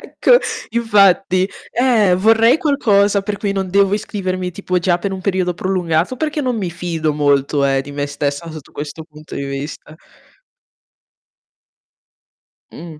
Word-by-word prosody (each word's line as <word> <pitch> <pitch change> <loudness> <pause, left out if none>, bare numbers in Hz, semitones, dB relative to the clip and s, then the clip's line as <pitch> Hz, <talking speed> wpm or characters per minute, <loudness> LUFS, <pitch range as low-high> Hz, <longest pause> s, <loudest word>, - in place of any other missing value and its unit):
Ecco, - - +3 0.3
infatti, 195 -4 +3 0.2
eh! 230 -7 +3
Vorrei 225 - +4
qualcosa 205 -10 +2
per 205 +1 -3
cui 200 -2 -1
non 195 -1 -2
devo 200 +1 +3
iscrivermi 185 -3 -3
tipo 185 0 -2
già 175 0 +1
per 195 +2 -3
un 190 - -5
periodo 185 -2 -1
prolungato, 180 +1 -1
perché 300 +1 -2
non 255 -4 -1
mi 190 -5 -3
fido 165 -2 -2
molto, 145 -1 +1
eh, 135 -1 +2
di 135 - -9
me 145 0 -3
stessa 145 +3 -3
sotto 155 -3 -11
questo 150 +2 -7
punto 155 -1 -13
di 140 - -4
vista. 140 +2 -7 2.8
Mh. 165 -3 -10
185 Hz, 145 wpm, -18 LUFS, 155-205 Hz, 2.8 s, Vorrei